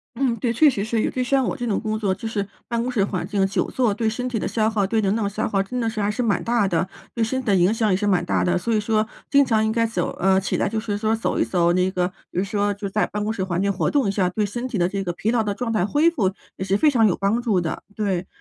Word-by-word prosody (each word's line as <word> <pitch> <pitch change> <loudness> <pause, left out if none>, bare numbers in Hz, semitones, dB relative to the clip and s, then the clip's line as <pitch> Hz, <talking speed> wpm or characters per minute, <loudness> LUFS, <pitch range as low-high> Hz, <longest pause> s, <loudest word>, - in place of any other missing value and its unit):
嗯， 250 -2 +1
对， 235 +1 0
确 290 +6 +5
实 200 -6 -2
是 220 0 0
有， - - +1
就 255 - -2
像 265 +1 +2
我 - - -2
这 245 - -4
种 215 -4 0
工 215 -1 -2
作 200 -3 0
就 225 - -6
是 205 -3 -2 0.2
办 235 -1 -1
公 250 - -2
室 220 -6 +1
环 180 -4 -3
境 195 0 +1
久 195 - -1
坐， 240 -5 +1
对 220 +1 0
身 250 +3 -3
体 245 -3 -2
的 - - -2
消 220 -1 +1
耗， 205 -3 0
对 220 +3 0
人 200 -1 +1
脑 220 -3 0
消 210 +2 -2
耗 195 -2 +1
真 250 +5 -4
的 230 - 0
是 220 -1 -3
还 205 +1 +1
是 250 - -2
蛮 220 -4 +1
大 235 -4 +2
的， 170 -1 +1 0.3
对 230 - +1
身 260 +4 -1
体 - - -13
的 200 - +4
影 180 +4 +4
响 225 -1 +1
也 185 - +3
是 205 +2 -1
蛮 180 -4 +2
大 - - +1
的， 180 0 +2
所 225 +6 -1
以 215 - +3
说 215 0 +1 0.2
经 280 -1 +5
常 220 -2 +2
应 220 - +1
该 230 0 +2
走 225 - -1
呃， 190 0 +4
起 190 - -1
来 - - +1
就 220 +1 -2
是 205 -2 -2
说 220 +1 +1
走 225 - -1
一 - - +3
走 175 -2 +2
那 180 +1 +2
个 180 -1 0 0.2
比 - - -9
如 185 - +2
说 205 0 0
就 200 0 -5
在 215 +2 +1
办 210 0 -3
公 215 - -1
室 210 - -4
环 185 -1 -1
境 200 0 +1
活 190 - 0
动 285 -5 +2
一 195 - +1
下， 195 -2 +1
对 210 +3 -1
身 240 +5 -4
体 240 - -3
的 175 -1 +2
这 195 +1 -3
个 175 -2 -3
疲 215 +6 -1
劳 240 - +2
的 210 -2 -1
状 240 -2 -3
态 215 -4 +1
恢 305 +8 +3
复 195 - 0 0.2
也 190 - -3
是 195 +1 +1
非 300 +8 +4
常 225 -5 +4
有 180 - +2
帮 200 +4 0
助 210 -7 +1
的， 160 - -4
对。 195 -4 -1
215 Hz, 350 characters per minute, -23 LUFS, 195-230 Hz, 0.3 s, 确